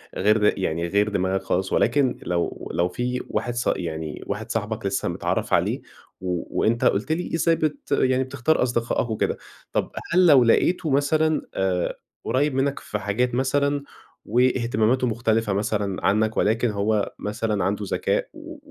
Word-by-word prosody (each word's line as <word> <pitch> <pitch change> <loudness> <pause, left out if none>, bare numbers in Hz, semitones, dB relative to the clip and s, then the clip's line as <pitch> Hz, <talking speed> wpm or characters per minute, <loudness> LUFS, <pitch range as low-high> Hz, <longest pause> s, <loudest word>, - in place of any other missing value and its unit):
غير 105 +1 +3
يعني 85 -1 -1
غير 100 +3 +2
دماغك 95 -1 0
خالص 95 0 -1
ولكن 140 -4 +2
لو 85 -1 -2
لو 85 +2 +2
في 125 +6 -2
واحد 120 - -2
صا 120 - +1
يعني 80 -3 -5
واحد - - -4
صاحبك 110 -1 -3
لسّه 95 0 -1
متعرّف - - -2
عليه - - +1 0.4
و 90 -2 -3
وأنت 115 +2 +2
قُلت 120 +10 +1
لي 165 0 -1
إزاي 165 0 +3
بت 150 -2 -3
يعني 130 -1 +2
بتختار 135 +2 +1
أصدقائك 120 -1 0
وكده، 110 - -1 0.4
طب - - -1 0.2
هل 180 0 +5
لو 135 -5 +7
لقيته 175 +8 +2
مثلًا 155 +3 +2
آآ 95 -2 -1 0.3
قريّب 145 +2 +1
منّك 135 +1 0
في 105 - -5
حاجات 120 +5 0
مثلًا، 140 +2 +1 0.4
واهتماماته 120 0 +2
مختلفة 115 -2 0
مثلًا 100 -2 -1
عنّك 110 +3 +2
ولكن 115 +3 +2
هو 105 0 0
مثلًا 105 -2 -2
عنده 100 +2 -1
ذكاء - - 0
و - - -10
115 Hz, 155 wpm, -24 LUFS, 100-130 Hz, 0.4 s, لو